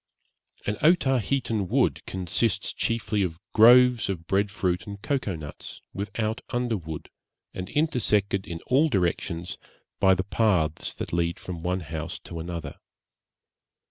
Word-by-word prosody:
An 105 0 -1
Otaheitan 135 - +2
wood - - +1
consists 95 +4 -1
chiefly 110 -2 -1
of 85 -3 -2
groves 120 0 +7
of 85 -4 -3
bread 100 +3 +1
fruit 90 -3 -1
and 100 -1 -7
cocoa 120 -5 -1
nuts, 75 -2 -8
without 110 +2 -2
underwood, 110 -11 -3 0.5
and 90 0 -5
intersected 105 -10 +1
in 85 -1 -6
all 145 +5 +3
directions 90 - -1 0.4
by 95 -1 +5
the 95 - -1
paths 90 -8 +1
that - - -6
lead 85 0 0
from 90 -3 -6
one 90 +2 -1
house 80 -1 -5
to 85 - -8
another. 85 0 -6
95 Hz, 130 wpm, -26 LUFS, 85-115 Hz, 0.5 s, groves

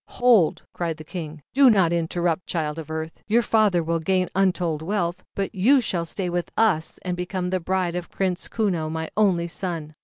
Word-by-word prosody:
"Hold!" 235 -10 +4
cried 165 -3 -3
the 155 - -9
King. 155 -3 -7
"Do 270 0 +7
not 190 -7 +4
interrupt, 170 +1 -1
Child 155 -2 -2
of 155 -1 -8
Earth, 160 0 -5
your 230 +3 +3
father 210 -6 +3
will 165 +1 0
gain 185 +2 +1
wealth - - -46
untold, 180 -5 +1 0.5
but 195 +1 -2
you 235 +8 +4
shall. 180 -8 -2
stay 180 +3 -3
with 175 0 -2
us 185 -8 +2
and 180 -1 -2
become 180 0 -3
the 185 - +1
bride 180 0 -1
of 180 -1 -4
Prince 185 -2 -2
Kuno, 180 -8 -1
my 160 0 -4
only 190 -5 +3
son. 165 -3 -5
180 Hz, 190 wpm, -24 LUFS, 165-195 Hz, 0.5 s, Do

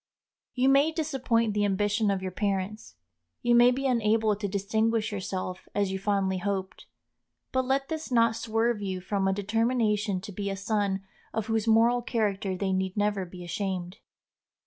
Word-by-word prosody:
You 255 +1 +2
may 280 +3 +5
disappoint 265 -8 0
the 205 0 +1
ambition 205 +2 +1
of 195 -1 -1
your 185 - -3
parents, 195 - -3 0.5
you 240 - +3
may 240 +1 +7
be 265 +2 -1
unable 220 -3 +2
to 205 0 -3
distinguish 220 +3 0
yourself 185 -2 -4
as 200 -2 +1
you 190 - -3
fondly 195 -2 0
hoped; 190 -1 -4 0.6
but 260 -1 +1
let 270 +1 0
this 315 -3 -5
not 230 -2 +4
swerve 225 0 0
you 190 -2 -3
from 195 +1 -1
a - - +3
determination 210 0 +1
to 200 - -8
be 200 +1 -3
a 195 - -3
son 200 -1 -1 0.3
of 220 -2 -1
whose 225 0 -1
moral 230 +2 +4
character 205 -5 -1
they 190 0 -1
need 190 +1 -1
never 205 -2 +1
be 180 0 -10
ashamed. 180 0 -3
210 Hz, 170 wpm, -28 LUFS, 195-230 Hz, 0.6 s, may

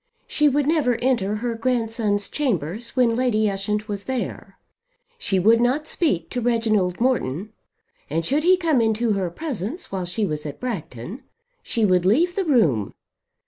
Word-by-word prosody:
She 300 -1 +2
would 285 +1 +1
never 290 -6 +2
enter 230 -5 0
her 235 +2 -2
grandson's 225 -3 0
chambers 225 - -2
when 240 -3 +3
Lady 230 -4 +2
Ushant 210 +2 -2
was 200 -2 -4
there. 260 -2 -4 0.6
She 195 - 0
would 225 +5 +4
not 260 +5 +1
speak 185 - -1
to 245 - -2
Reginald 220 -6 +1
Morton, 215 - 0 0.6
and 165 +3 -1
should 285 - +1
he 365 +2 +5
come 320 -8 +2
into 225 +1 +1
her 190 -3 -1
presence 275 - -5
while 190 -2 -2
she 205 +5 -1
was 150 -4 -3
at 145 - -8
Bragton 200 - -5 0.4
she 225 -2 0
would 180 -3 +3
leave 330 - +3
the 390 - 0
room. 165 - +2
225 Hz, 160 wpm, -23 LUFS, 195-255 Hz, 0.6 s, he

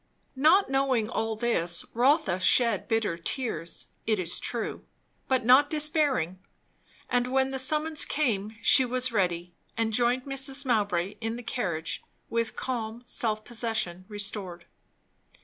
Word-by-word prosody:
Not 315 +9 +4
knowing 265 -5 +1
all 225 0 -1
this, 175 -7 0
Rotha 260 - +2
shed 220 +2 +3
bitter 220 -7 0
tears, 170 - -3 0.2
it 215 -1 +2
is 180 -2 -2
true, 235 -2 -4 0.4
but 260 -3 +1
not 265 +4 +6
despairing. 295 - 0 0.7
And 245 0 +1
when 265 +1 +1
the 265 - -3
summons 305 +3 +3
came, 220 -7 -1
she 265 - +6
was 255 0 +1
ready, 175 -4 -1 0.2
and 225 -1 0
joined 245 +2 +2
Mrs. 275 0 +1
Mowbray 205 -6 0
in 225 0 -2
the 245 - -8
carriage 175 -10 -3 0.3
with 230 -1 -1
calm 235 -2 -4
self 215 -3 -2
possession 220 -7 -2
restored. 195 -4 -4
230 Hz, 130 wpm, -27 LUFS, 200-265 Hz, 0.7 s, not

